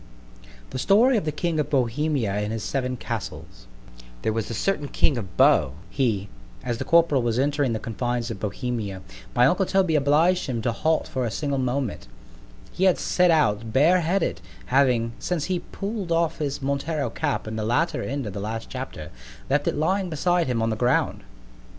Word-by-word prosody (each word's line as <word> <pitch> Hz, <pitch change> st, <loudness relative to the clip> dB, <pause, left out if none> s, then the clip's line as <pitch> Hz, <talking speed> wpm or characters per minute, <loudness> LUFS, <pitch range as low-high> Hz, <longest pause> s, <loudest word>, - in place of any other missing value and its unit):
THE 130 Hz, -, -4 dB
STORY 225 Hz, -, +4 dB
OF 200 Hz, -, -2 dB
THE 155 Hz, -, 0 dB
KING 160 Hz, +1 st, -1 dB
OF 150 Hz, -, -1 dB
BOHEMIA 135 Hz, -2 st, 0 dB
AND 105 Hz, +1 st, -2 dB
HIS 110 Hz, -1 st, -3 dB
SEVEN 130 Hz, -2 st, -2 dB
CASTLES -, -, -6 dB, 0.6 s
THERE 110 Hz, -, +1 dB
was 110 Hz, -1 st, -2 dB
a 115 Hz, -, -3 dB
certain 150 Hz, -, -1 dB
king 140 Hz, -, +1 dB
of 100 Hz, -7 st, -6 dB
Bo 65 Hz, -, +5 dB, 0.2 s
he—— 110 Hz, -5 st, 0 dB, 0.4 s
As 120 Hz, -2 st, -2 dB
the -, -, -1 dB
corporal 165 Hz, -5 st, +4 dB
was 120 Hz, -1 st, 0 dB
entering 140 Hz, -2 st, +1 dB
the -, -, -1 dB
confines 120 Hz, +1 st, -2 dB
of 105 Hz, -, -6 dB
Bohemia, 105 Hz, -3 st, -4 dB, 0.3 s
my 120 Hz, -, +5 dB
uncle 180 Hz, +7 st, +2 dB
Toby 190 Hz, -4 st, +2 dB
obliged 155 Hz, +5 st, +3 dB
him 125 Hz, -3 st, -2 dB
to 120 Hz, -, +1 dB
halt 160 Hz, +7 st, 0 dB
for 130 Hz, -, -2 dB
a 120 Hz, -, 0 dB
single 140 Hz, +4 st, -2 dB
moment; 130 Hz, -, -2 dB, 0.6 s
he 190 Hz, -, 0 dB
had 185 Hz, -, +4 dB
set 180 Hz, -1 st, +2 dB
out 115 Hz, -9 st, +2 dB
bare 160 Hz, +8 st, +5 dB
headed, 175 Hz, +2 st, 0 dB, 0.3 s
having, 125 Hz, -4 st, +3 dB
since 175 Hz, -5 st, -2 dB
he 185 Hz, -1 st, -1 dB
pull'd 200 Hz, -2 st, -5 dB
off 165 Hz, -1 st, +1 dB
his 140 Hz, -2 st, -3 dB
Montero 140 Hz, +2 st, -1 dB
cap 145 Hz, -7 st, -2 dB
in 110 Hz, -, -4 dB
the 110 Hz, -, -2 dB
latter 125 Hz, +10 st, +1 dB
end 140 Hz, 0 st, -3 dB
of 105 Hz, -, -5 dB
the 100 Hz, -, -5 dB
last 110 Hz, +2 st, -5 dB
chapter, 130 Hz, -, -6 dB, 0.4 s
left 145 Hz, +1 st, +2 dB
it -, -, +1 dB
lying 185 Hz, +5 st, +1 dB
beside 175 Hz, +1 st, +1 dB
him 120 Hz, -3 st, 0 dB
on 115 Hz, -, +1 dB
the -, -, 0 dB
ground. 120 Hz, +3 st, +1 dB
135 Hz, 190 wpm, -24 LUFS, 115-160 Hz, 0.6 s, Bo